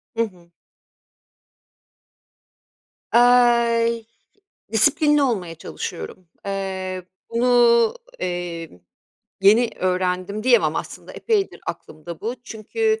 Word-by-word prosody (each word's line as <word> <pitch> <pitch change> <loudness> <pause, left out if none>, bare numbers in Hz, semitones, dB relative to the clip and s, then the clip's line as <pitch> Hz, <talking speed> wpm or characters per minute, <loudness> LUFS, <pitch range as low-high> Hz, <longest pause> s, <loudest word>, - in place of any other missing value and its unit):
Hı 230 - +2
hı. 180 -6 -10 2.6
Aaa, 235 -1 +4 0.9
disiplinli 295 +6 +3
olmaya 195 -11 -1
çalışıyorum. 170 +1 -7 0.2
Eee, 190 -1 -4 0.3
bunu, 235 -1 +4 0.2
emm, 175 - -5 0.6
yeni 220 +5 +5
öğrendim 185 +2 -1
diyemem, 250 -2 +3
aslında - - -7
epeydir 425 -4 -1
aklımda 160 +2 -7
bu. 230 +4 -3
Çünkü 440 - -1
220 Hz, 80 wpm, -22 LUFS, 185-245 Hz, 2.6 s, yeni